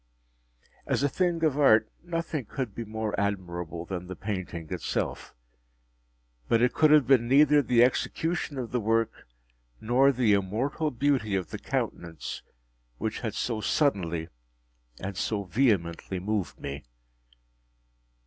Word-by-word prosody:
As - - +1
a - - +4
thing 175 0 0
of 150 -2 +2
art 110 -6 +5 0.2
nothing 165 -5 -3
could 125 -3 -4
be 115 - -5
more 110 -1 -4
admirable 90 -4 -3
than 90 -1 -5
the 95 - -6
painting 95 -6 -5
itself. - - -3 1.1
But 115 - +3
it 125 +2 +3
could 155 - +4
have 150 -3 +6
been 125 -3 +4
neither 145 +3 +6
the 120 -2 +4
execution 160 +4 0
of 125 -3 -4
the 125 - 0
work, 115 - 0 0.5
nor 130 +5 +4
the 120 -5 +2
immortal 115 +11 0
beauty 130 -5 +1
of 95 -2 -3
the - - -5
countenance, 85 -2 -4 0.6
which 110 - -3
had 110 -3 -4
so 115 -3 -2
suddenly 85 - 0 0.7
and 95 +1 -5
so 100 +2 -1
vehemently 95 -4 0
moved 95 -6 -2
me. 70 0 -6
110 Hz, 135 wpm, -28 LUFS, 95-135 Hz, 1.1 s, have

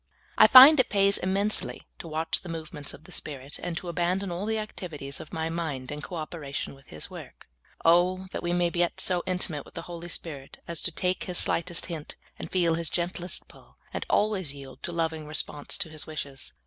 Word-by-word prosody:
I - - +8
find 270 +3 +11
it 255 - +4
pa3^s 200 0 +4
immensely 200 +3 0
to - - -7
watch 160 +1 -1
the 180 - -9
movements 155 -3 -4
of 155 - -17
the - - -15
Spirit, 140 -2 -4
and 175 -1 -3
to 180 - -5
abandon 175 +3 0
all 180 +4 -3
the 220 0 +1
activities 160 -10 -4
of - - -10
my 160 0 -2
mind 145 -6 -3
in 150 0 -5
co 175 - -6
operation 155 -3 -4
wdth 135 0 -18
His 75 - -7
work. - - -11 0.4
Oh, 180 +3 +4
that - - -4
we 175 - -1
may 175 -1 +2
get 175 0 0
so 180 -1 +2
intimate 180 -5 -1
wdth - - -17
the 165 - -4
Holy 175 0 -7
Spirit 145 -5 -6
as 170 -2 -2
to 180 - -1
take 180 +2 -1
His 180 -1 -1
slightest 170 0 +1
hint, 160 -4 -6 0.2
and - - -6
feel 175 -3 +3
His 165 0 -1
gentlest 175 0 -3
pull, - - -19 0.2
and - - -2
always 190 -9 +1
yield 135 -1 -10
a - - -4
loving 160 -2 -2
response 150 -1 -2
to 160 - -2
His 155 -1 -5
wishes 140 - -4
170 Hz, 210 wpm, -28 LUFS, 155-180 Hz, 0.4 s, find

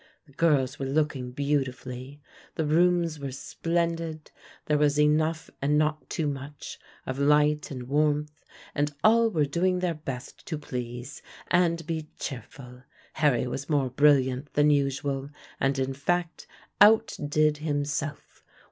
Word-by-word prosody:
The 145 - -21
girls 145 -4 +2
were 135 - -2
looking 140 -3 0
beautifully; 135 0 -3 0.3
the 160 - -1
rooms 170 0 +2
were 140 -1 -5
splendid; 165 +2 -2 0.3
there 150 -1 +2
was 145 0 +3
enough 155 +2 +2
and 145 +2 +2
not 155 0 0
too 160 - -2
much 140 0 -6 0.3
of 130 +1 -4
light 150 +1 +3
and 130 -3 -6
warmth, 150 +1 0 0.3
and 145 0 -1
all 230 +1 +5
were 155 -8 +1
doing 180 +5 +1
their 180 -1 0
best 135 -5 -7
to 155 - -3
please 125 0 -6 0.3
and 170 -2 +2
be 160 -2 -3
cheerful. 125 0 -8 0.3
Harry 140 -6 +2
was 135 +3 -5
more 140 -4 +1
brilliant 135 0 +3
than 150 0 +4
usual, 140 -1 0 0.3
and 135 +1 +1
in 135 0 -1
fact 170 +5 -2 0.3
outdid 155 -9 +4
himself. 145 0 -3
150 Hz, 135 wpm, -27 LUFS, 135-155 Hz, 0.3 s, all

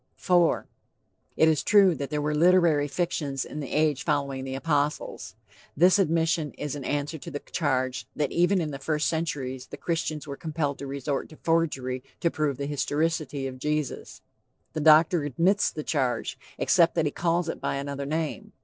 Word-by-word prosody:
IV. 175 -3 +3 0.7
"It 160 - +5
is 155 -3 +3
true 200 -3 +5
that 140 -3 -5
there 150 -1 -2
were 150 0 0
literary 165 -2 +4
fictions 145 -3 -2
in 150 - -7
the 140 - -6
age 150 -3 +1
following 140 -3 -1
the 130 0 -4
apostles." 145 +1 -2 0.4
This 180 +5 +5
admission 165 -3 +1
is 150 -1 -4
in 140 - -6
answer 145 +3 -2
to - - -8
the 145 - -4
charge 130 -5 -2
that 150 -2 -1
even 175 +3 +3
in 155 -3 -2
the 140 - -6
first 150 +1 0
centuries 135 -6 -3
the - - -9
Christians 160 -3 -2
were 140 -2 -6
compelled 150 -3 -3
to 140 - -6
resort 140 +1 -3
to 155 - -13
forgery 135 -6 0 0.2
to 170 - +1
prove 150 -4 -1
the 140 - -3
historicity 145 0 -1
of 130 -1 -6
Jesus. 150 0 -3 0.5
The - - -2
doctor 155 +2 +6
admits 175 +9 +2
the 155 - -6
charge, 130 -7 -1 0.2
except 170 -2 +3
that 165 -2 +2
he 145 - 0
calls 170 +1 0
it 165 - -4
by - - -1
another 140 0 -4
name. 165 +7 -3
150 Hz, 180 wpm, -26 LUFS, 140-165 Hz, 0.7 s, doctor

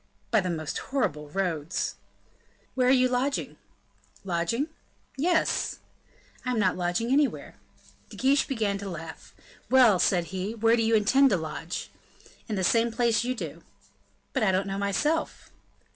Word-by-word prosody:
"By 220 - +4
the 180 - -3
most 155 -4 -3
horrible 170 - -2
roads." 170 -2 -2 0.8
"Where 255 -1 +2
are - - +5
you 255 -1 +5
lodging?" 255 +3 -1 0.7
"Lodging?" 195 - -1 0.5
"Yes!" 320 +3 +1 0.7
"I 250 - -3
am 250 - 0
not 195 -4 +2
lodging 180 +7 -1
anywhere." 285 +1 +1 0.6
De - - -11
Guiche 275 +2 +3
began 215 -6 -1
to 200 0 -5
laugh. 165 -2 -9 0.3
"Well," 245 -8 +6
said 175 -1 +3
he, 190 +4 -3
"where 225 +1 +3
do 235 - +1
you 225 0 +3
intend 265 +6 +4
to 195 - +2
lodge?" 160 +1 -5 0.6
"In 215 - -1
the 190 - -1
same 230 +5 +3
place 235 -1 +1
you 255 +1 -1
do." - - -6 0.7
"But 265 - 0
I 205 -3 +3
don't 185 +1 +1
know, 195 0 -3
myself." 295 +11 -1
220 Hz, 155 wpm, -27 LUFS, 185-255 Hz, 0.8 s, Well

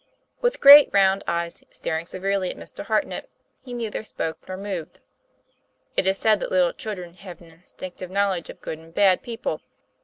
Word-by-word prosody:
With 485 0 +2
his - - -13
great, 285 0 +10
round 195 0 +3
eyes 170 0 -3
staring 160 +1 -4
severely 190 0 -1
on - - -11
Mr. - - -8
Hartnett, - - -1 0.3
he 255 - -11
neither 230 -3 -4
spoke 160 -6 -4
nor 185 0 -5
moved. 190 -5 -6 1.0
It 190 - +1
is 190 0 +2
said 215 -1 +3
that - - -4
little 180 -2 +3
children 180 -6 -6
have 185 0 -11
an 170 -1 -16
instinctive 180 +2 -10
knowledge 195 -3 0
of - - -11
good 160 - -6
and 165 0 -16
bad 195 -3 +4
peo 235 -1 -7
ple. - - -3
190 Hz, 185 wpm, -24 LUFS, 175-205 Hz, 1.0 s, great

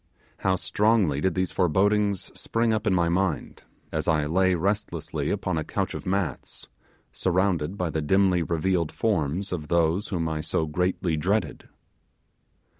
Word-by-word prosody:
How 95 -1 +1
strongly 95 -4 +2
did 95 0 +1
these 95 -1 0
forebodings 100 +3 +1
spring 115 0 0
up 110 0 -1
in 95 - +3
my 85 -2 +2
mind 90 -1 -1 0.3
as 80 -1 -2
I 80 -3 +2
lay 95 +4 +2
restlessly 95 -2 -2
upon 90 -3 -1
a - - -2
couch - - -2
of - - -7
mats 95 -2 -3 0.4
surrounded 90 -1 0
by 90 -4 -1
the 80 - -1
dimly 95 +3 +3
revealed 85 0 0
forms 95 -2 -1
of 80 -4 -4
those 85 +3 +1
whom 85 -4 -2
I 80 -1 -2
so 80 - -1
greatly 90 +1 -1
dreaded! 100 +8 -1
90 Hz, 150 wpm, -26 LUFS, 80-100 Hz, 0.4 s, in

